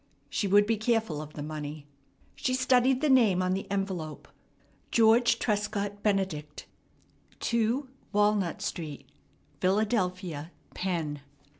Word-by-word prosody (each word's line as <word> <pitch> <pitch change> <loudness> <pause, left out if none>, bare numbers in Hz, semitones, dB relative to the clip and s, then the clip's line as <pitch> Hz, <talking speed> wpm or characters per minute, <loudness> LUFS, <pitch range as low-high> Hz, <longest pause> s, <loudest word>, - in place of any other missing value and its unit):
She 205 - 0
would 205 +2 +5
be 225 +1 +1
careful 220 -8 0
of 155 0 -9
the 145 - -6
money. 150 -1 -6 0.5
She 255 - 0
studied 255 0 +3
the 305 - +2
name 220 -9 +5
on 185 0 +1
the 195 +1 -4
envelope. 190 -6 -3 0.6
George 230 +1 +5
Trescott 205 -1 -1
Benedict, 185 -8 -1 0.7
2 235 +4 0 0.2
Walnut 205 -3 +1
Street, 155 -5 -5 0.5
Philadelphia, 185 -6 0 0.2
Penn. 165 -6 -2
200 Hz, 115 wpm, -29 LUFS, 165-225 Hz, 0.7 s, would